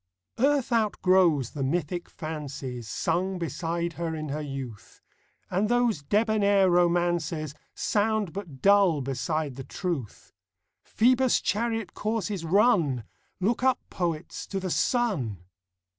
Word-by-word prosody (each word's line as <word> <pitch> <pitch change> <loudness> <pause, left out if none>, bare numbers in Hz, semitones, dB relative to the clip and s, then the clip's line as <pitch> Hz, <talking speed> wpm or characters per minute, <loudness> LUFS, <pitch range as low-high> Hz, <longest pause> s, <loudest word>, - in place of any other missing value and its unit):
ARTH 275 -1 +2
outgrows 185 - +3
the 145 - -6
mythic 170 +5 -1
fancies 140 -6 -6
Sung 190 +2 -1
beside 170 0 -2
her 165 0 -3
in 155 -1 -5
her 150 +2 -3
youth; 135 -7 -7 0.5
And 200 +4 +1
those 240 -8 +2
debonair 200 +2 +3
romances 175 -3 +1 0.2
Sound 215 -3 0
but 175 -9 -8
dull 195 -6 +5
beside 135 +2 -2
the 135 - -5
truth. 140 - -5 0.5
Phoebus' 255 +2 +3
chariot 225 -1 -1
course 215 0 -2
is 190 -5 -3
run! 165 - +3 0.4
Look 215 +6 +1
up, 260 0 +3
poets, 170 -3 -3
to 195 - -3
the 185 -2 -3
sun 165 - 0
175 Hz, 120 wpm, -27 LUFS, 150-210 Hz, 0.5 s, dull